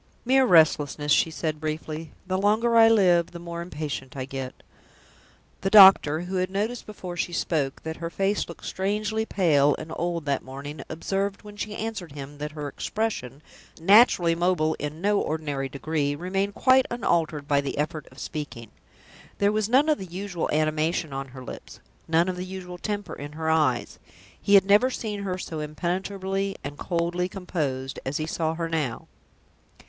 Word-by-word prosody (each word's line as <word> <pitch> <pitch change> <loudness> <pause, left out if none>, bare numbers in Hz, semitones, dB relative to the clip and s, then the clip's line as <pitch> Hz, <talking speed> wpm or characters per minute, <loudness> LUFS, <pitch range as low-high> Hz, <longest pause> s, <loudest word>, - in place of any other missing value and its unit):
"Mere 265 +2 +4
restlessness!" 150 - +4
she 165 - +4
said, 155 -1 -3
briefly. 155 0 -4
"The 185 0 -1
longer 220 +4 +2
I 225 0 +8
live, 180 -6 +4
the - - -6
more 170 0 -6
impatient 150 -6 -5
I 130 - -3
get." 135 -1 -7 1.0
The 195 - 0
doctor, 190 -7 +8
who 185 +2 -3
had 185 0 0
noticed 215 +5 -3
before 185 -4 -7
she 175 - -2
spoke 150 -5 -1
that 160 0 -5
her 165 0 -4
face 195 +3 -1
looked 170 - -10
strangely 215 +3 -1
pale 145 -7 +3
and 155 +1 -7
old 170 -2 -2
that 140 -2 0
morning, 140 +2 -8
observed, 195 +5 -2
when 210 0 -11
she 210 0 -5
answered 215 -9 -5
him, 145 0 -9
that 150 +1 -5
her 150 -2 -5
expression 150 - -3 0.4
naturally 185 -2 +6
mobile 170 -2 +1
in 150 +3 -5
no 205 +1 +2
ordinary 145 -4 -2
degree 145 +1 -1
remained 195 +5 -2
quite 260 0 +4
unaltered 165 -10 0
by 140 -1 +3
the 140 0 -4
effort 150 0 -2
of 130 - -18
speaking. 145 -9 -6 0.7
There 200 0 +3
was 215 0 0
none 270 +5 +4
of 305 -1 +2
the 190 - -5
usual 180 0 -4
animation 155 0 0
on 135 0 -4
her 130 0 -10
lips, - - -10 0.3
none 165 +2 +3
of 185 -1 -2
the 180 - -3
usual 180 -1 -8
temper 205 -1 -4
in 145 +1 -8
her 160 0 -1
eyes. 150 -7 +1 0.4
He 200 - +4
had 195 -1 +7
never 205 +6 +5
seen 210 -5 -4
her 185 -2 -2
so 160 -3 -5
impenetrably 190 +5 -2
and 140 +1 -5
coldly 175 +1 -1
composed 145 -9 -3
as 135 +2 -2
he 155 - -2
saw 160 0 -1
her 165 0 -2
now. 150 -8 -2
170 Hz, 175 wpm, -26 LUFS, 150-195 Hz, 1.0 s, I